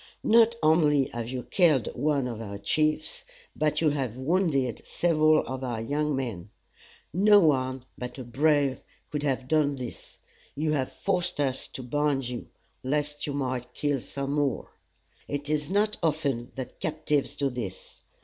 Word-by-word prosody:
Not 230 +1 +5
only 150 -3 +4
have 115 0 -4
you 125 -1 -4
killed 155 - +3
one 140 0 +1
of 115 -2 -5
our 100 -2 -6
chiefs, 155 +9 0 0.3
but 150 0 +1
you 155 -2 +4
have 130 -5 -2
wounded 140 - +1
several 155 -2 +3
of 130 0 -5
our 120 -3 -2
young 145 +5 0
men. 115 -9 -4 0.6
No 205 +4 +6
one 130 -6 +1
but 125 +1 -6
a 130 - -5
brave 140 +2 +2 0.3
could 150 - -2
have 130 -3 -1
done 150 -1 +2
this. 125 -3 -8 0.4
You 155 +2 0
have 135 -4 0
forced 180 -5 -1
us 135 -2 0
to 130 - -8
bind 140 0 0
you, 125 -1 -5 0.4
lest 145 +2 -1
you 145 - -2
might 130 -3 -3
kill 145 -3 0
some 140 +2 -4
more. 145 -3 -1 0.6
It 145 0 -4
is 150 0 0
not 210 +2 +1
often 145 -7 0
that 130 -1 -7
captives 150 -2 -1
do 140 -1 0
this. 105 -7 -6
145 Hz, 160 wpm, -27 LUFS, 130-155 Hz, 0.6 s, No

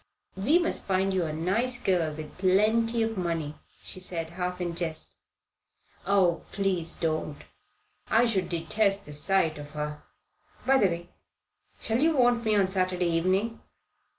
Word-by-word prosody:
"We 230 - +3
must 345 -1 +1
find 190 0 +1
you 185 -3 +1
a 155 - -3
nice 210 +11 0
girl 175 -7 +1
with 155 0 -8
plenty 220 +5 +3
of 225 -3 -2
money," 165 -4 -2 0.3
she - - -4
said, 170 -3 -3
half 180 +1 -3
in 175 -1 -2
jest. 165 -2 -4 0.9
"Oh, 190 -4 +3
please 185 -4 -1
don't. 155 -2 -2 0.7
I 230 +2 +4
should 205 -6 0
detest 195 +4 0
the 150 - -9
sight 160 0 +2
of 145 +1 -10
her. 150 0 -4 0.6
By 270 0 +4
the 200 - +5
way, 170 0 -5 0.7
shall 225 +2 -1
you 315 +1 +3
want 245 -2 +3
me 215 -2 +2
on 195 -2 +3
Saturday 185 -2 0
evening?" 190 +7 0
185 Hz, 150 wpm, -27 LUFS, 165-215 Hz, 0.9 s, the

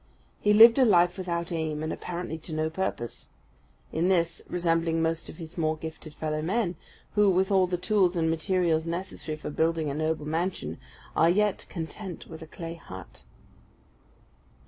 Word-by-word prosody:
He 210 - +3
lived 230 +4 +9
a - - +7
life 180 -6 +5
without 170 -3 -3
aim, 155 -2 -2
and 155 - -2
apparently 170 -2 -5
to 160 +1 -8
no 155 0 0
purpose; 165 -9 -4 0.6
in 170 +3 +1
this 170 -3 +1
resembling 165 -2 +1
most 165 0 -1
of - - -10
his 170 0 -8
more 155 -1 +1
gifted 155 -1 -8
fellow 155 -1 -2
men, 185 +2 0 0.4
who, 210 -1 +5
with 190 +1 +2
all 190 -2 +4
the 180 0 -1
tools 185 0 +2
and 165 -1 +1
materials 165 0 +1
necessary 170 -2 -4
for 150 - -6
building 160 -1 +1
a - - -3
noble 155 0 -1
mansion, 160 - -2 0.4
are 165 - +5
yet 205 +3 +1
content 175 +2 -6
with 160 -1 -10
a 160 - -9
clay 165 +1 -7
hut. 95 - -10
165 Hz, 170 wpm, -28 LUFS, 160-185 Hz, 0.6 s, lived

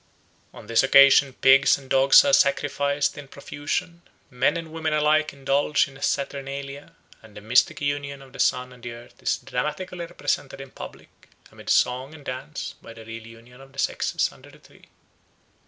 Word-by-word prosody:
On - - -13
this 115 - +3
occasion 140 0 +6
pigs 135 +1 +5
and 135 -2 -14
dogs 135 - +6
are 280 - +2
sacrificed 145 - +1
in 145 - -10
profusion; 145 +5 -5 0.3
men 140 +6 +1
and 165 -1 -7
women 160 -1 -2
alike 150 +1 +2
indulge 140 +2 +1
in 140 - -15
a 135 - -15
saturnalia; 140 0 -4 0.3
and 110 -2 -16
the - - -7
mystic 115 +7 +2
union 145 -1 -3
of 135 -1 -18
the 135 - -12
sun 125 0 0
and 125 - -17
the 120 0 -7
earth 120 +1 -15
is - - 0
dramatically 180 -2 -4
represented 145 -5 -3
in 135 -1 -10
public, - - -13 0.2
amid - - -11
song 130 +4 +1
and 145 -3 -15
dance, 130 - -6
by 115 - -12
the 115 -1 -13
real 115 0 -9
union 115 +3 -16
of 135 0 -16
the - - -19
sexes - - -1
under - - -17
the - - -17
tree. - - -21
140 Hz, 180 wpm, -24 LUFS, 125-145 Hz, 0.3 s, occasion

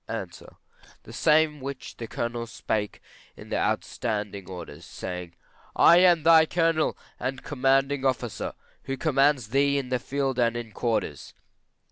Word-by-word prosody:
A. - - -4 0.8
The - - -12
same 155 -1 +3
which 135 0 -7
the 115 - -6
Colonel 120 0 -3
spake 105 -2 -3 0.3
in - - -12
the - - +1
standing 105 -4 -4
orders, 85 -3 -9
saying, 90 0 -7 0.4
I 170 - +7
am 175 -3 +5
thy 160 -1 +7
Colonel 165 -2 +1 0.2
and 130 0 -4
commanding 135 0 +1
officer, 125 -4 -2 0.3
who 135 0 -3
commands 140 -5 +2
thee 140 +3 +2
in 135 -2 -3
the 125 -1 0
field 135 -1 -2
and 120 -1 +2
in 115 -2 -6
quarters. 115 +1 -3
130 Hz, 140 wpm, -26 LUFS, 115-145 Hz, 0.8 s, I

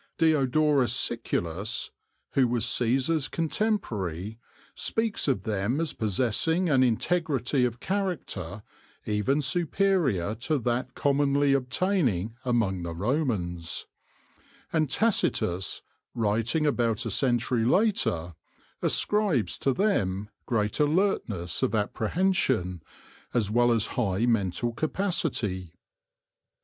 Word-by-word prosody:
Diodorus 150 -3 +3
Siculus, 90 +7 -2 0.4
who 130 -2 +3
was 120 -2 +1
Caesar's 135 +5 +1
contemporary, 110 - -2 0.3
speaks 225 -6 0
of 135 - +1
them 110 +6 -1
as 165 -2 -1
possessing 130 - +1
an 135 -2 +4
integrity 135 0 +1
of 120 -1 -3
character 140 - -3 0.4
even 110 +8 0
superior 165 - +1
to 120 +7 -1
that 120 0 -2
commonly 140 0 +2
obtaining 125 - 0
among 115 -8 0
the 85 -1 -5
Romans; 95 - -1 0.9
and 155 -3 +1
Tacitus, 115 - +1 0.3
writing 115 +8 0
about 120 -5 +1
a 115 - -2
century 120 0 +1
later, 115 - +1 0.5
ascribes 190 - +1
to 135 - +1
them 105 - 0 0.2
great 105 0 0
alertness 145 - 0
of 110 - +1
apprehension, 110 - 0 0.5
as 105 -4 +1
well 120 +1 +4
as 115 -2 +2
high 110 -2 0
mental 115 0 0
capacity. 125 - -2
120 Hz, 100 wpm, -27 LUFS, 105-155 Hz, 0.9 s, an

